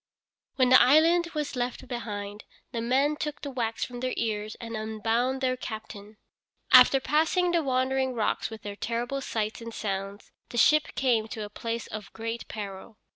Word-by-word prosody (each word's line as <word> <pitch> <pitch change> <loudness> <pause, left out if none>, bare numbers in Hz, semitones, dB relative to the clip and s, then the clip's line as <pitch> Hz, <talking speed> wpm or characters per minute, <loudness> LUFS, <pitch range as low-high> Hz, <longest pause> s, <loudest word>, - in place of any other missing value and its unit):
When 255 -2 +3
the 255 - +8
island 330 +5 +5
was 300 -2 -2
left 250 +1 -3
behind, 210 -4 -5 0.3
the 235 -3 -3
men 270 +5 +2
took 300 -1 -4
the 285 - -4
wax 230 -3 -2
from 245 -1 -8
their 255 0 -2
ears 215 -1 -2
and 230 -1 -6
unbound 225 +4 -1
their 255 -1 +1
captain. 215 -3 -8 0.5
After 255 +1 +8
passing 320 +6 +2
the 340 -1 +2
Wandering 260 -1 0
Rocks 220 -2 0
with 220 -1 -10
their 205 -1 -6
terrible 240 +5 -3
sights 220 -2 -3
and 230 0 -7
sounds 200 -1 -5 0.2
the 240 - -6
ship 305 +5 +4
came 235 -5 +2
to 220 -2 -5
a 205 - -11
place 230 +2 -4
of 210 -2 -8
great 230 +1 -5
peril. 205 0 -7
235 Hz, 175 wpm, -27 LUFS, 220-265 Hz, 0.5 s, the